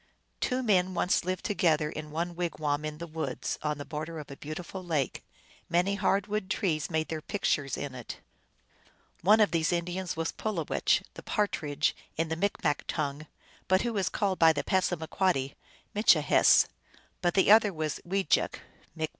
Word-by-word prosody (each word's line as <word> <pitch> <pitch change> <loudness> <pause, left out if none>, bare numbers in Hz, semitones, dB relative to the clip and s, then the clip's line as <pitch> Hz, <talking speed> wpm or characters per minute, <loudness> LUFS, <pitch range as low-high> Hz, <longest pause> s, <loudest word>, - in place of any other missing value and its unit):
Two 255 0 0
men 185 -4 +2
once 180 - +2
lived 185 0 -3
together 165 -7 +2
in 155 0 -6
one 170 +3 -3
wigwam 155 -4 -1
in 155 0 -4
the 170 - -6
woods, 155 -5 -4
on 150 -1 -1
the 145 - -7
border 155 +1 -5
of 150 -2 -8
a - - -7
beautiful 170 +6 -7
lake. 155 -6 -1 0.5
Many 180 +3 +2
hard 200 -1 +1
wood 210 -2 -3
trees 165 -7 0
made 160 -2 -1
their 160 -1 -3
pictures 145 -7 -1
in 140 -2 -5
it. 125 -2 -7 1.0
One 210 +5 +5
of 210 - +4
these 165 -1 +1
Indians 175 0 -2
was 165 0 -1
Pulowech, 195 -8 0
the - - -9
Partridge 150 -8 0 0.2
in 165 0 0
the 160 - -1
Micmac 165 -4 0
tongue, 150 0 -3 0.4
but 185 +1 +3
who 235 -2 -2
is 195 - +1
called 195 -3 -1
by 160 -1 +7
the 145 - -2
Passamaquoddy 175 -5 0 0.4
Mitchihess; 210 +2 +5 0.6
but 175 -2 +1
the 195 +1 +5
other 215 -1 +7
was 155 -3 -3
Wejek 190 -1 +1 0.4
(M.) 160 - 0
170 Hz, 165 wpm, -29 LUFS, 155-190 Hz, 1.0 s, by